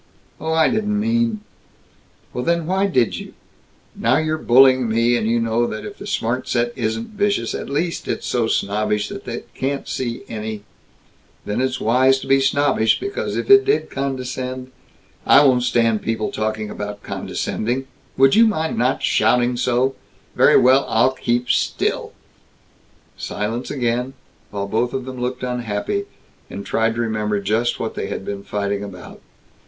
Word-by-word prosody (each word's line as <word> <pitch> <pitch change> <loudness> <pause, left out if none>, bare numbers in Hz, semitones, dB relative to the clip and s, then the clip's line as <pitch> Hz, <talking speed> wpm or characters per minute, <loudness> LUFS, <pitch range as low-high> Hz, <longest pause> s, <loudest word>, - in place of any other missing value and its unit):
Oh, 160 - -3
I 160 -1 +4
didn't 210 -1 0
mean 230 0 0 0.5
" - - -32
"Then 170 +6 0
why 190 +3 +1
did 125 - +1
you - - -10 0.3
" - - -35
"Now 130 - +2
you're 155 0 -1
bullying 130 -1 +5
me, 115 +2 +2
and 110 -2 0
you 115 +1 +2
know 115 +1 +1
that 110 - -6
if 205 - -9
the 205 - -8
smart 125 - -1
set 120 0 0
isn't 115 -2 -2
vicious, 205 - 0
at - - -5
least 165 +5 -2
it's - - -3
so 120 -2 0
snobbish 105 0 0
that - - -8
it - - -6
can't 140 +1 -3
see 120 -2 -3
any 110 -1 -5 0.4
" - - -35
"Then 105 +4 -1
it's 130 0 -1
wise 130 +4 +4
to - - -7
be 135 0 +4
snobbish, 135 -4 +2
because 400 0 -3
if - - -3
it 400 0 +9
did 415 +2 0
condescend 130 -1 -4 0.3
" - - -33
"I 145 - +8
won't 130 -2 +4
stand 115 -3 +2
people 110 -1 -2
talking 110 -1 -3
about 105 0 -6
condescending 125 +4 -3 0.2
" - - -35
"Would 135 0 +5
you 230 +2 +6
mind 160 -7 -1
not 125 +3 +1
shouting 125 0 +2
so?" 125 +2 +1 0.4
"Very - - +6
well! 130 +2 +5
I'll 120 +4 +3
keep 120 -1 -1
still!" - - -1 1.0
Silence 110 +4 -4
again, 125 0 -1 0.3
while 100 -1 -4
both 115 +4 0
of 130 -1 -3
them 130 -1 -7
looked 125 +1 -3
unhappy, 125 - -2 0.4
and 100 - -7
tried 115 0 0
to 120 - -1
remember 105 -2 -1
just 110 +4 0
what - - -3
they - - -4
had - - -5
been 100 -1 -4
fighting 100 0 -2
about. 95 -3 -10
125 Hz, 170 wpm, -20 LUFS, 110-135 Hz, 1.0 s, it